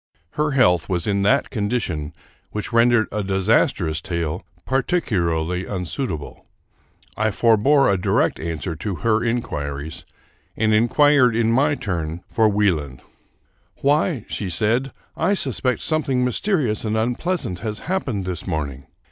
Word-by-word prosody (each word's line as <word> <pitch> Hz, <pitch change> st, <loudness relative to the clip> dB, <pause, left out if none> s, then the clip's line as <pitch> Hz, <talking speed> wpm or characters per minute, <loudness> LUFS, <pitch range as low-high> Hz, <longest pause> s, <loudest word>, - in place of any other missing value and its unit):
Her 150 Hz, -1 st, -1 dB
health 90 Hz, -, +3 dB
was 90 Hz, -3 st, 0 dB
in 100 Hz, -1 st, +1 dB
that 125 Hz, +8 st, +2 dB
condition 105 Hz, -, -2 dB, 0.4 s
which 105 Hz, +2 st, -5 dB
rendered 115 Hz, -1 st, +4 dB
a 105 Hz, -, -2 dB
disastrous 95 Hz, -, +1 dB
tale 85 Hz, -2 st, -3 dB, 0.2 s
particularly 90 Hz, -, 0 dB
unsuitable. 90 Hz, -, -4 dB, 0.7 s
I 110 Hz, +1 st, +1 dB
forbore 115 Hz, +7 st, +4 dB
a 100 Hz, -2 st, +2 dB
direct -, -, +1 dB
answer 80 Hz, +1 st, -4 dB
to 100 Hz, +3 st, -3 dB
her 110 Hz, 0 st, +3 dB
inquiries, 75 Hz, -11 st, -3 dB, 0.5 s
and 110 Hz, 0 st, +2 dB
inquired, 125 Hz, +2 st, +4 dB
in 115 Hz, -1 st, +2 dB
my 145 Hz, +5 st, +3 dB
turn, 85 Hz, -, -4 dB
for 110 Hz, -1 st, +2 dB
Wie 105 Hz, -1 st, +3 dB
land. 70 Hz, -5 st, -6 dB, 0.4 s
'* 85 Hz, +2 st, -42 dB
Why," 145 Hz, -, +1 dB
said 110 Hz, +6 st, 0 dB
she, -, -, -13 dB, 0.2 s
" -, -, -41 dB
I 200 Hz, -, +3 dB
suspect 125 Hz, -, -1 dB
something 135 Hz, -5 st, +1 dB
mysterious 125 Hz, -, 0 dB
and 110 Hz, 0 st, -1 dB
unpleasant 120 Hz, -, -1 dB
has 110 Hz, -2 st, -4 dB
happened 130 Hz, -, -2 dB
this 90 Hz, -2 st, -5 dB
morning. 70 Hz, -4 st, -4 dB
105 Hz, 140 wpm, -22 LUFS, 90-125 Hz, 0.7 s, rendered